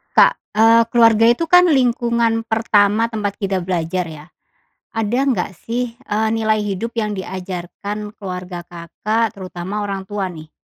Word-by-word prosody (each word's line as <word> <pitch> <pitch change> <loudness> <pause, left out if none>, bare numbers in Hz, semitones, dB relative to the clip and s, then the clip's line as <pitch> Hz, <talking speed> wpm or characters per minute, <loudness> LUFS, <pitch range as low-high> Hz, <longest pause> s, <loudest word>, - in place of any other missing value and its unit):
Kak, - - +7 0.2
eee, 225 +1 +6
keluarga 230 -2 +5
itu, 240 +7 +3
kan, 360 0 +7
lingkungan 235 -5 +2
pertama 220 0 +2
tempat 205 -3 -2
kita 195 -2 -1
belajar, 175 0 -2
ya. 155 -2 -10 0.7
Ada 225 +2 -1
nggak, 200 -7 -1
sih, 235 0 -3
eee, 220 -3 -1
nilai 220 -1 +1
hidup 205 +4 -3
yang 215 -2 0
diajarkan 190 +3 -6
keluarga 180 -3 -6
Kakak, 215 +7 -2
terutama 190 +2 -5
orang 195 -1 -4
tua, 200 0 -3
nih? 160 -3 -10
210 Hz, 140 wpm, -19 LUFS, 185-230 Hz, 0.7 s, Kak